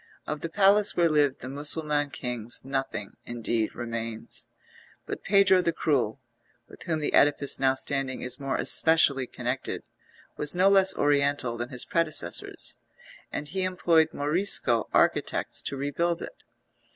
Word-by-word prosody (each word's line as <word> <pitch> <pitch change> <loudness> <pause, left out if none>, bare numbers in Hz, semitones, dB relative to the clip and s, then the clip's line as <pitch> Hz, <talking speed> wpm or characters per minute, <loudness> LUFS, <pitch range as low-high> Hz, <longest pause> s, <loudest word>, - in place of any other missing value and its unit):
Of 150 0 -5
the 165 - -4
palace 200 +3 +3
where 170 -2 +3
lived 145 -3 +1
the - - -7
Mussulman 145 +1 -2
Kings 120 -4 -5
nothing, 135 -6 -4
indeed, 115 -2 -3
remains; 115 -1 -4 0.6
but - - -6
Pedro 195 -1 +4
the 170 - 0
Cruel, 135 -7 -1 0.5
with - - -16
whom 165 -3 -2
the 150 - -2
edifice 145 -1 +3
now 135 0 +2
standing 135 -1 -3
is 125 - -4
more 135 -1 -2
especially 140 -5 +4
connected, 125 +2 -4 0.5
was 150 +3 +3
no 185 +2 +4
less 195 -1 +5
oriental 140 -4 +1
than 120 +1 -5
his 125 -2 -1
predecessors, 165 -2 -1 0.5
and 150 - -5
he 190 +4 -3
employed 175 -3 +2
Morisco 145 - +1
architects - - +1
to 140 - -4
rebuild 165 +5 -1
it. - - -10
145 Hz, 140 wpm, -26 LUFS, 130-165 Hz, 0.6 s, less